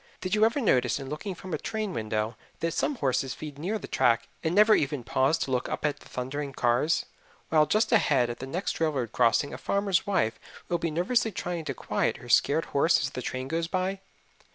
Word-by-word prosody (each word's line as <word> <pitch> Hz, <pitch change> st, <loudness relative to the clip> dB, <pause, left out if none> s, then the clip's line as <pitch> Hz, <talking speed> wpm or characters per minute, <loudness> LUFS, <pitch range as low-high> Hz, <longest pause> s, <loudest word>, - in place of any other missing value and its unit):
Did 185 Hz, +1 st, -3 dB
you 215 Hz, 0 st, +4 dB
ever 230 Hz, +6 st, +1 dB
notice 125 Hz, -, +2 dB
in 135 Hz, -1 st, -7 dB
looking 180 Hz, +6 st, -5 dB
from 185 Hz, 0 st, -8 dB
a 155 Hz, -, -1 dB
train 215 Hz, -3 st, -3 dB
window 110 Hz, +1 st, -2 dB, 0.2 s
that 165 Hz, -1 st, -1 dB
some 290 Hz, -, 0 dB
horses 135 Hz, -, 0 dB
feed 150 Hz, -2 st, -8 dB
near 195 Hz, +8 st, -1 dB
the -, -, -8 dB
track 115 Hz, -1 st, +2 dB, 0.2 s
and 160 Hz, +2 st, 0 dB
never 215 Hz, +1 st, +7 dB
even 145 Hz, -, +1 dB
pause 130 Hz, +7 st, +2 dB
to 135 Hz, -, -3 dB
look 125 Hz, -1 st, 0 dB
up -, -, -3 dB
at 145 Hz, -1 st, 0 dB
the -, -, -16 dB
thundering 135 Hz, +3 st, -4 dB
cars, 125 Hz, +7 st, +1 dB, 0.4 s
while 155 Hz, -1 st, +4 dB
just 215 Hz, +3 st, +2 dB
ahead 140 Hz, -, +4 dB
at 120 Hz, -, -6 dB
the 130 Hz, -, -6 dB
next 180 Hz, +9 st, -3 dB
railroad 145 Hz, -8 st, 0 dB
crossing 125 Hz, +4 st, +2 dB
a -, -, -6 dB
farmer's 200 Hz, -2 st, 0 dB
wife 115 Hz, -, +1 dB, 0.3 s
will 175 Hz, -, 0 dB
be 165 Hz, -, -1 dB
nervously 220 Hz, +9 st, +1 dB
trying 175 Hz, -3 st, -4 dB
to -, -, -3 dB
quiet -, -, -1 dB
her -, -, -12 dB
scared -, -, +3 dB
horse -, -, +4 dB
as -, -, -2 dB
the -, -, -5 dB
train 130 Hz, 0 st, -4 dB
goes 165 Hz, +3 st, -1 dB
by? 185 Hz, +2 st, -1 dB
155 Hz, 220 wpm, -28 LUFS, 130-190 Hz, 0.4 s, never